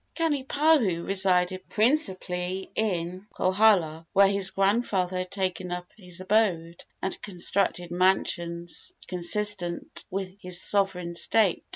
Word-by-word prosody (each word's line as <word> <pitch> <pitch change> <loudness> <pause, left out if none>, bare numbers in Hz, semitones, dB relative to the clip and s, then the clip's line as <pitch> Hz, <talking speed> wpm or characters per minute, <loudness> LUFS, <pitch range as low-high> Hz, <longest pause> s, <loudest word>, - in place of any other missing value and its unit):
Kanipahu 285 - +1
resided 185 -1 +2
principally 190 - -1
in 185 -2 -3
Kohala, 185 -5 +2
where 200 0 +6
his 200 -1 +3
grandfather 195 -2 0
had 185 0 -4
taken 185 -2 -3
up 180 0 -4
his 180 -4 -5
abode, 185 -4 0 0.2
and 190 - -3
constructed 180 -2 0
mansions 175 -2 -1
consistent 180 0 0
with 190 0 -5
his 180 -1 -1
sovereign 190 -4 0
state. 195 +2 +1
185 Hz, 105 wpm, -26 LUFS, 180-205 Hz, 0.2 s, where